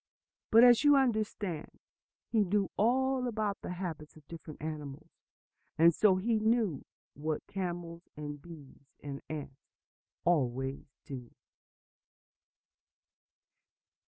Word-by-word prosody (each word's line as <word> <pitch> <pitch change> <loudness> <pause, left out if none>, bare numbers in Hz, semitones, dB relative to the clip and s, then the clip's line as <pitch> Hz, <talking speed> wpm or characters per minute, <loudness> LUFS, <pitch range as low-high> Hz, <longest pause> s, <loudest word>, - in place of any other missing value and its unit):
But, 230 +2 +7
as 245 +1 +7
you 290 -1 +7
understand, 215 - -1 0.5
he 220 -3 +4
knew 200 +1 0
all 255 +3 +2
about 215 -3 -2
the - - -6
habits 170 -4 -6
of 155 -2 -18
different 160 -2 -10
animals; 150 -3 -6 0.7
and 165 +1 +6
so 195 +3 +4
he 220 +4 +1
knew 220 - +1 0.3
what 155 +1 -3
camels 175 -3 -5 0.2
and 145 -1 -6
bees 145 -5 -13 0.2
and 140 -1 -6
ants 145 -3 -6 0.6
always 135 -5 0 0.2
do. 125 -4 -7
170 Hz, 105 wpm, -32 LUFS, 150-215 Hz, 0.7 s, But